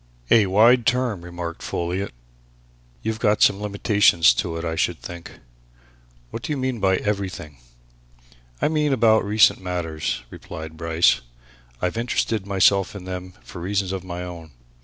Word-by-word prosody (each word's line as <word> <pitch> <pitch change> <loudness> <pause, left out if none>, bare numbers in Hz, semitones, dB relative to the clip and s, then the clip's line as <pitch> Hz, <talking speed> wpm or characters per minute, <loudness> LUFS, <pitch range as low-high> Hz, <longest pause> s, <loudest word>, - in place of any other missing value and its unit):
"A 110 -4 +6
wide 115 +5 +5
term!" 125 -6 +1
remarked 85 -1 -6
Folliot. 90 +3 -3 0.9
"You've 110 0 -2
got 105 -1 +3
some 100 0 +3
limitation 100 -3 +2
to 80 +4 +3
it, 85 - -5
I 80 - -2
should - - 0
think. 85 +7 -9 1.0
What 115 - -6
do - - -5
you 145 - -1
mean 130 -2 -2
by 95 -1 +3
everything?" 95 -9 -4 1.0
"I - - +2
mean 150 -2 +1
about 110 -3 +4
recent 105 -1 +4
matters," 80 -7 -3
replied 80 0 -9
Bryce. 85 0 +2 0.6
"I've 90 +5 -1
interested 115 -3 -1
myself 100 0 +3
in 100 - -7
them 90 0 -6
for 90 - -10
reasons 95 +1 -1
of 95 -2 -4
my 90 -1 -6
own. 85 -3 -9
95 Hz, 150 wpm, -23 LUFS, 85-110 Hz, 1.0 s, A